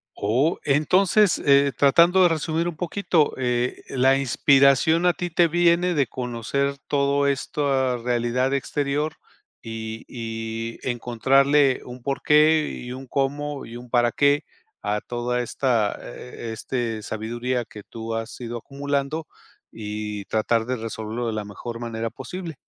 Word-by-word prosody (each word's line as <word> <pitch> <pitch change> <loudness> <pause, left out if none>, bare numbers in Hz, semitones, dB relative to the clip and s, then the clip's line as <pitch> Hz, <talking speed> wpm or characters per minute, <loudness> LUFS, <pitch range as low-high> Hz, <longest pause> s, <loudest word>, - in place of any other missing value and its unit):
Oh, 130 - +1
entonces, 180 +7 +3
eh, 140 0 +5
tratando 170 +8 +5
de - - +7
resumir 160 +1 -1
un 175 - -4
poquito, 175 -2 +1
eh, 125 -1 -1
la 135 +1 +3
inspiración 140 +4 +4
a 180 - +5
ti 175 0 -4
te 170 +1 +3
viene 175 +2 +3
de 145 -4 +2
conocer 125 +4 -2
todo 140 0 +2
esto, 135 -2 0
realidad 125 +2 0
exterior 145 +2 -1 0.5
y 110 0 -6
y 115 -1 -5
encontrarle 135 +3 +2
un 125 0 -9
porqué, 150 +3 +3
y 125 - -7
un 130 +1 -8
cómo, 145 +1 -2
y 115 +1 -9
un 125 0 -11
para 120 -1 +3
qué, 145 +2 +3 0.4
a 105 0 -1
toda 125 0 -2
esta, 120 -3 0
eh 120 -2 -8
eh, - - -3
este, 115 -1 -3
sabiduría 120 +4 -3
que 105 -1 -11
tú 115 +1 -6
has 115 +1 -5
ido 120 0 -4
acumulando 140 +4 -3 0.4
y 105 -1 -5
tratar 110 +2 +1
de 130 +2 -1
resolverlo 115 0 -4
de 115 - -2
la 105 -1 -3
mejor 115 +3 -7
manera 115 -1 -3
posible. 165 +7 -7
130 Hz, 145 wpm, -24 LUFS, 115-145 Hz, 0.5 s, de